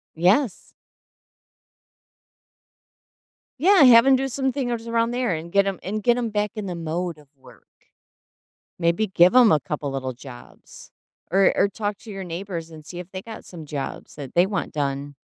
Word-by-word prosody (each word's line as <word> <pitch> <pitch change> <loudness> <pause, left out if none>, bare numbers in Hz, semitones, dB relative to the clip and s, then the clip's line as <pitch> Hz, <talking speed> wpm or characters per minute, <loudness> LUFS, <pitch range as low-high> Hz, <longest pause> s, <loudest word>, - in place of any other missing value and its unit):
Yes. 190 - +1 2.9
Yeah, 375 +2 +6
have 235 -2 +8
him 270 0 +6
do 270 +1 -1
some 265 0 -1
things 240 -3 -3
around 230 0 +1
there 245 -4 -1
and 165 +1 -6
get 200 +1 +3
him 195 -2 -3
and 210 +3 -3
get 240 +2 +3
him 240 -2 -1
back 210 -1 -1
in 215 -2 -5
the 180 -2 -4
mode 170 +1 -3
of 150 -1 -19
work. 130 - -19 1.1
Maybe 170 +6 +1
give 180 -1 +4
him 245 -4 +7
a 155 - +4
couple 145 -1 -4
little 130 -1 -4
jobs 65 - -14 0.4
or 195 +1 +4
or - - +4
talk 205 +1 -4
to 225 - -11
your 195 -1 -6
neighbors 170 -1 -6
and 155 -1 -12
see 175 +2 -8
if 180 +1 -10
they 185 - -6
got 220 +1 -10
some 165 -4 -10
jobs 145 -2 -6
that 140 -3 -9
they 175 +1 +5
want 195 0 -3
done. 140 -1 -3
190 Hz, 175 wpm, -23 LUFS, 160-230 Hz, 2.9 s, have